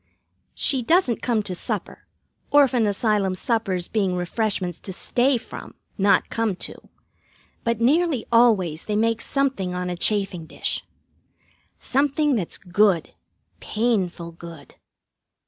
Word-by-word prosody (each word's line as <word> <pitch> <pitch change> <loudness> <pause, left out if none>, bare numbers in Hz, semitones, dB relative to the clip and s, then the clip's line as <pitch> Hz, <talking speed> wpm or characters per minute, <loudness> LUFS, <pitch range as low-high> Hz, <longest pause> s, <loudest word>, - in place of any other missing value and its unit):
She 270 -4 +1
doesn't 315 - +2
come 230 -4 +1
to 190 - -2
supper, 180 - -4 0.4
orphan 265 -6 +4
asylum 205 -2 +1
suppers 190 -4 -1
being 195 -4 0
refreshments 180 -1 -2
to 190 - -7
stay 250 +7 +1
from, 235 - -10 0.2
not 200 0 +2
come 225 -4 0
to, - - -6 0.9
but 230 -1 0
nearly 285 +1 +2
always 205 -9 +3
they 210 - -2
make 225 +1 +1
something 260 -10 -1
on 180 0 -2
a - - -3
chafing 190 -3 0
dish. - - -3 0.9
Something 285 +1 +1
that's 190 -7 -3
good, 185 -2 +1 0.5
painful 195 -7 -1
good. 165 -3 -12
215 Hz, 120 wpm, -23 LUFS, 180-240 Hz, 0.9 s, orphan